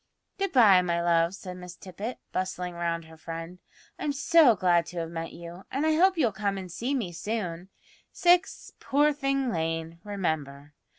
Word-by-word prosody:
"Good 390 Hz, 0 st, 0 dB
bye, 210 Hz, -8 st, +7 dB
my 170 Hz, -1 st, 0 dB
love," 170 Hz, +1 st, +2 dB
said 180 Hz, -2 st, -8 dB
Miss 180 Hz, -1 st, -9 dB
Tippet, 200 Hz, +7 st, -7 dB
bustling 180 Hz, -1 st, -3 dB
round 170 Hz, -1 st, -2 dB
her 160 Hz, 0 st, -15 dB
friend. 165 Hz, +2 st, -7 dB, 0.4 s
"I'm 290 Hz, -, -1 dB
so 280 Hz, -2 st, +5 dB
glad 175 Hz, -3 st, +2 dB
to 180 Hz, -, -9 dB
have 165 Hz, -1 st, -3 dB
met 165 Hz, 0 st, -5 dB
you, 170 Hz, +2 st, -10 dB
and 280 Hz, +4 st, -1 dB
I 315 Hz, -, +3 dB
hope 370 Hz, +3 st, +4 dB
you'll 250 Hz, -8 st, +2 dB
come 200 Hz, -1 st, -2 dB
and 185 Hz, -2 st, -7 dB
see 245 Hz, +10 st, -2 dB
me 215 Hz, -10 st, -2 dB
soon; 180 Hz, -1 st, -4 dB, 0.4 s
6 355 Hz, +2 st, +2 dB
Poor 295 Hz, +2 st, +2 dB
thing 275 Hz, -3 st, 0 dB
Lane, 165 Hz, 0 st, -3 dB
remember. 150 Hz, -8 st, -3 dB
180 Hz, 175 wpm, -27 LUFS, 170-250 Hz, 0.4 s, bye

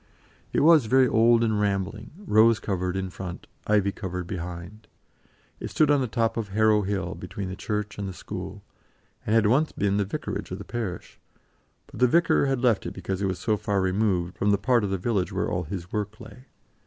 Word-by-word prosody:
It -, -, +1 dB
was 155 Hz, -5 st, +6 dB
very 130 Hz, +2 st, +5 dB
old 115 Hz, +1 st, +4 dB
and 110 Hz, -2 st, +1 dB
rambling, 100 Hz, +2 st, -2 dB
rose 115 Hz, -, +4 dB
covered 90 Hz, -2 st, -2 dB
in 95 Hz, -1 st, -3 dB
front, 90 Hz, -2 st, -7 dB, 0.2 s
ivy 105 Hz, -2 st, +3 dB
covered 90 Hz, -3 st, -5 dB
behind; 90 Hz, +3 st, -7 dB, 0.7 s
it -, -, -5 dB
stood 150 Hz, -1 st, +3 dB
on 145 Hz, -2 st, +3 dB
the 130 Hz, -, 0 dB
top 115 Hz, 0 st, 0 dB
of 115 Hz, -3 st, -2 dB
Harrow 105 Hz, +1 st, +3 dB
Hill, 100 Hz, -1 st, -2 dB
between 100 Hz, -2 st, -6 dB
the 95 Hz, -, -5 dB
church 105 Hz, 0 st, -4 dB
and 100 Hz, -, -3 dB
the -, -, -5 dB
school, -, -, -7 dB, 0.6 s
and 110 Hz, -, +2 dB
had 115 Hz, -1 st, +4 dB
once 135 Hz, +9 st, +3 dB
been 100 Hz, 0 st, 0 dB
the 100 Hz, -, +2 dB
vicarage 100 Hz, -, -5 dB
of 90 Hz, -, -5 dB
the 100 Hz, -, -8 dB
parish, 105 Hz, -4 st, -6 dB, 0.7 s
but -, -, -12 dB
the 125 Hz, -, +5 dB
vicar 165 Hz, 0 st, +3 dB
had 135 Hz, -2 st, -1 dB
left 115 Hz, -5 st, +2 dB
it -, -, -7 dB
because 95 Hz, +1 st, -4 dB
it 100 Hz, -, +1 dB
was 95 Hz, -1 st, -2 dB
so 110 Hz, -3 st, 0 dB
far 100 Hz, -1 st, -1 dB
removed 95 Hz, -2 st, 0 dB
from 100 Hz, -, +2 dB
the 100 Hz, -, +4 dB
part 120 Hz, +3 st, +2 dB
of 100 Hz, -, -1 dB
the 95 Hz, -, -1 dB
village 95 Hz, 0 st, -1 dB
where -, -, -2 dB
all -, -, -1 dB
his 90 Hz, -2 st, -6 dB
work 105 Hz, 0 st, -3 dB
lay. 115 Hz, +2 st, -12 dB
105 Hz, 210 wpm, -26 LUFS, 95-115 Hz, 0.7 s, was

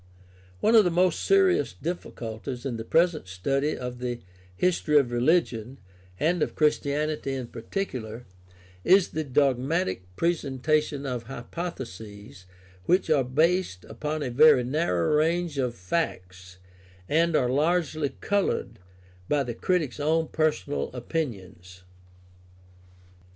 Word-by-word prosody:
One 225 Hz, -, +3 dB
of 220 Hz, -2 st, +8 dB
the 180 Hz, -, +2 dB
most 180 Hz, 0 st, +2 dB
serious 390 Hz, +1 st, +3 dB
difficulties 120 Hz, -, -6 dB
in 125 Hz, -4 st, -2 dB
the 110 Hz, -, -5 dB
present 165 Hz, -, +2 dB
study 135 Hz, +11 st, -1 dB
of 125 Hz, -1 st, -6 dB
the 120 Hz, -1 st, -3 dB, 0.4 s
history 165 Hz, -, +2 dB
of 135 Hz, -4 st, +3 dB
religion, 125 Hz, -2 st, +1 dB, 0.4 s
and 170 Hz, +2 st, +1 dB
of -, -, -1 dB
Christianity 150 Hz, -1 st, 0 dB
in 130 Hz, -2 st, -4 dB
par 115 Hz, 0 st, -10 dB
ticular, 120 Hz, -, -4 dB, 0.6 s
is 190 Hz, 0 st, +5 dB
the 155 Hz, -, -3 dB
dogmatic 135 Hz, -, 0 dB
presentation 150 Hz, -, 0 dB
of 125 Hz, -3 st, -3 dB
hypotheses 115 Hz, -, -8 dB, 0.4 s
which 180 Hz, -3 st, +2 dB
are 145 Hz, -4 st, +4 dB
based 155 Hz, -, +1 dB
upon 150 Hz, +7 st, -4 dB
a 125 Hz, -, -3 dB
very 140 Hz, 0 st, +6 dB
narrow 130 Hz, -, +1 dB
range 165 Hz, -1 st, 0 dB
of 125 Hz, -3 st, -1 dB
facts 90 Hz, -, -4 dB, 0.5 s
and 165 Hz, +4 st, +2 dB
are 125 Hz, -4 st, +2 dB
largely 155 Hz, 0 st, +1 dB
colored 200 Hz, -, -1 dB, 0.5 s
by 145 Hz, -1 st, +2 dB
the 120 Hz, -2 st, -4 dB
critic's 155 Hz, +1 st, -1 dB
own 160 Hz, +2 st, +1 dB
personal 155 Hz, -2 st, -1 dB
opinions. 95 Hz, -, -5 dB
140 Hz, 120 wpm, -26 LUFS, 120-165 Hz, 0.6 s, of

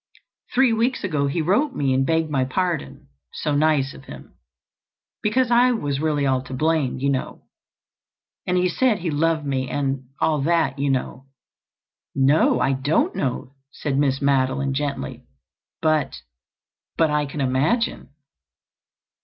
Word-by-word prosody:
Three 255 Hz, -2 st, +3 dB
weeks 235 Hz, +3 st, 0 dB
ago 140 Hz, -2 st, 0 dB
he 155 Hz, +4 st, -1 dB
wrote 250 Hz, -, +1 dB
me 135 Hz, -2 st, +1 dB
and 130 Hz, +1 st, +2 dB
begged 165 Hz, 0 st, +1 dB
my 135 Hz, -3 st, +1 dB
pardon—so 130 Hz, -, -4 dB
nice 145 Hz, -2 st, +2 dB
of 135 Hz, -, -14 dB
him, -, -, -12 dB, 0.9 s
because 245 Hz, +3 st, +1 dB
I 245 Hz, +1 st, +5 dB
was 145 Hz, -, -2 dB
really 150 Hz, -2 st, 0 dB
all 130 Hz, -1 st, +1 dB
to 130 Hz, -, -6 dB
blame, 155 Hz, -2 st, 0 dB
you 140 Hz, +2 st, 0 dB
know. 130 Hz, -, -4 dB, 1.0 s
And 180 Hz, 0 st, +1 dB
he 180 Hz, 0 st, +3 dB
said 225 Hz, +5 st, +2 dB
he 175 Hz, -3 st, -3 dB
loved 155 Hz, +1 st, 0 dB
me 130 Hz, -2 st, -2 dB
and—all 135 Hz, +1 st, -1 dB
that, 155 Hz, -3 st, +1 dB
you 140 Hz, 0 st, 0 dB
know." 135 Hz, 0 st, -2 dB, 0.9 s
"No, 140 Hz, +3 st, +3 dB
I 135 Hz, -, +2 dB
don't 140 Hz, +4 st, 0 dB
know," 130 Hz, -1 st, -3 dB, 0.2 s
said 145 Hz, -1 st, -3 dB
Miss 135 Hz, -1 st, +1 dB
Madeline 135 Hz, 0 st, +1 dB
gently. 140 Hz, -, -4 dB, 0.6 s
"But—but—I 150 Hz, -, -2 dB
can 140 Hz, +2 st, -7 dB
imagine." 140 Hz, -, 0 dB
145 Hz, 135 wpm, -22 LUFS, 135-165 Hz, 1.0 s, I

